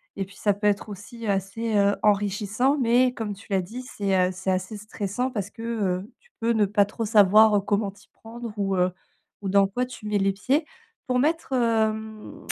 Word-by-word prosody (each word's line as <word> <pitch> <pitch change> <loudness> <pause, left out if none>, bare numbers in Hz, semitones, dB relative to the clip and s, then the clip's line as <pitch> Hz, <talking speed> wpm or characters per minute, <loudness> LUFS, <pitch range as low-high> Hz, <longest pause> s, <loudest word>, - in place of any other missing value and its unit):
et 195 - -3
puis 190 0 -17
ça 205 -2 +2
peut 205 +1 -5
être 205 +1 0
aussi 220 +3 -8
assez, 200 +3 -1
heu, 200 0 +3
enrichissant. 210 +6 +1
Mais 245 +1 +3
comme 220 -4 -4
tu 200 - -16
l'as 190 -1 +2
dit, 225 +8 -8
c'est, 200 -6 -2
heu, - - -4
c'est 185 +1 -2
assez 185 +3 -2
stressant 210 +3 -3
parce 205 -4 -3
que, - - -12
heu, 205 -4 -2
tu 485 - -29
peux 230 +1 +1
ne 215 -2 +3
pas 205 +1 +3
trop 225 +3 -4
savoir, 215 0 +6
heu, 200 - +3
comment 205 0 0
t'y 200 +2 -22
prendre 230 +1 -9
ou, 195 -1 0
heu, 180 0 +2 0.5
ou 195 - -3
dans 200 0 +4
quoi 245 +6 -2
tu 250 -4 -9
mets 210 -1 +1
les 195 0 +1
pieds. 275 - 0 0.4
Pour 250 -1 +1
mettre, 305 0 0
hem, 220 -2 -1
210 Hz, 210 wpm, -25 LUFS, 200-230 Hz, 0.5 s, savoir